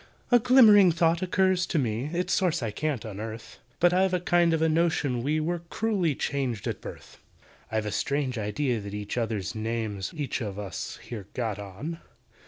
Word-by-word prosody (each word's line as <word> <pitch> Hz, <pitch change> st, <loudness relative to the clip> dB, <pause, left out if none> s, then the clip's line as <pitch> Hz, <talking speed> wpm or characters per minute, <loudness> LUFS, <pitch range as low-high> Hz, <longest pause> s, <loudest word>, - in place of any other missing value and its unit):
"A 245 Hz, -, +7 dB
glimmering 220 Hz, -6 st, +7 dB
thought 165 Hz, +1 st, +2 dB
occurs 185 Hz, -1 st, +2 dB
to 170 Hz, -, -1 dB
me 120 Hz, -2 st, 0 dB
(Its 175 Hz, +4 st, -1 dB
source 180 Hz, -8 st, +1 dB
I 110 Hz, -, -2 dB
can't 140 Hz, 0 st, -2 dB
unearth), 110 Hz, +2 st, -7 dB, 0.2 s
But 175 Hz, 0 st, +4 dB
I've 185 Hz, 0 st, +3 dB
a -, -, +1 dB
kind 175 Hz, -1 st, +3 dB
of 160 Hz, -, +1 dB
a 160 Hz, -, +3 dB
notion 155 Hz, -6 st, +1 dB
we 150 Hz, +5 st, 0 dB
Were 170 Hz, +3 st, -1 dB
cruelly 195 Hz, -9 st, 0 dB
changed 130 Hz, -8 st, -2 dB
at -, -, -3 dB
birth. -, -, -10 dB, 0.5 s
"I've 110 Hz, -1 st, -1 dB
a 105 Hz, -, -2 dB
strange 140 Hz, +1 st, -1 dB
idea 115 Hz, +3 st, -1 dB
that 100 Hz, 0 st, -7 dB
each 105 Hz, 0 st, -4 dB
other's 110 Hz, -5 st, -2 dB
names 110 Hz, -3 st, -3 dB
We've 155 Hz, -, -7 dB
each 135 Hz, -, -3 dB
of 100 Hz, -3 st, -4 dB
us 100 Hz, -3 st, -5 dB
here 105 Hz, -6 st, -7 dB
got 110 Hz, -5 st, -2 dB
on. 105 Hz, -, -6 dB
140 Hz, 190 wpm, -27 LUFS, 110-175 Hz, 0.5 s, A